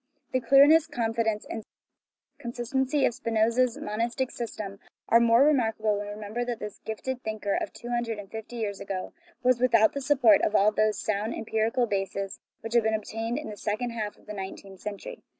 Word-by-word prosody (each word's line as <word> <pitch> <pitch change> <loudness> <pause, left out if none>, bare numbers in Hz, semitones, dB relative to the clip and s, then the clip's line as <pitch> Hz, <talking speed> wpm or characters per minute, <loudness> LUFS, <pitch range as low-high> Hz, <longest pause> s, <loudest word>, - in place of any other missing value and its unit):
The 255 - +1
clearness, 285 +6 +6
confidence, 225 -5 -1
and 225 - -5 0.8
consistency 260 +4 0
of - - +1
Spinoza's 230 +2 +1
monistic 235 +4 -2
system 210 -4 -6 0.3
are 230 - +7
the 235 - +4
more 230 +3 +6
remarkable 225 -7 +2
when 205 0 -4
we - - -5
remember 215 +3 -4
that 240 -1 -3
this 210 -2 -7
gifted 245 +4 -4
thinker 215 -3 -2
of - - -1
two 240 - -9
hundred 240 -2 -1
and 200 -2 -9
fifty 220 +2 -7
years 210 -4 -3
ago 190 -2 -5 0.3
was 250 -1 +4
with 250 -2 +3
out 220 -1 +5
the 280 - -3
support 260 -7 +5
of 215 - +1
all 210 +1 +5
those 215 0 +1
sound 215 +2 -1
empirical 225 +2 0
bases 195 -2 -3 0.2
which 225 +1 -6
have 235 - +5
been 220 0 +2
obtained 225 +3 -3
in 300 -7 -5
the - - -7
second 220 +4 -2
half 215 -3 -4
of - - -23
the 210 - -7
nineteenth 195 -1 -8
century. 210 - -7
225 Hz, 195 wpm, -27 LUFS, 210-245 Hz, 0.8 s, are